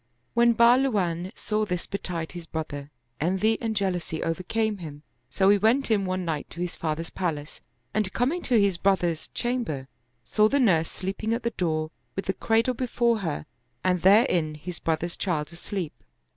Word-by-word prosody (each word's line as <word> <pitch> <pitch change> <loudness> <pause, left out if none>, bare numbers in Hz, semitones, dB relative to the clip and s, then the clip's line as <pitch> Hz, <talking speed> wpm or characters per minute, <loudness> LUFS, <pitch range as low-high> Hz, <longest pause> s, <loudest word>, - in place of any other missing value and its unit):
When 235 0 +5
Bahluwan 215 -8 +3
saw 215 0 -1
this 180 -4 -2
be 200 - -4
tide 165 -3 -4
his 175 -2 -8
brother, 145 -3 -5 0.3
envy 190 +7 +2
and 225 -1 -1
jealousy 180 -5 -1
overcame 205 +5 -1
him; 150 -3 -8 0.3
so 190 +8 +2
he 205 0 +5
went 230 +5 +3
in 200 -3 +3
one 185 0 -2
night 155 -3 -3
to - - -9
his 175 -1 -3
father's 160 +1 -3
palace 155 -5 -3 0.3
and 210 -3 +1
coming 275 - 0
to 240 -4 +4
his 200 -3 +3
brother's 175 -4 +1
chamber, 230 - -2 0.4
saw 215 0 +4
the 280 - +2
nurse 170 -10 +3
sleeping 200 +4 -2
at 235 - -5
the 235 - 0
door, 155 -5 -1 0.2
with 195 - -3
the 190 - 0
cradle 230 +4 +2
before 235 -2 +1
her 160 -6 -3 0.4
and 180 -2 +2
therein 185 - +4
his 170 +3 -7
brother's 165 +1 -1
child 155 -4 -2
asleep. 175 -1 -4
185 Hz, 170 wpm, -26 LUFS, 165-220 Hz, 0.4 s, When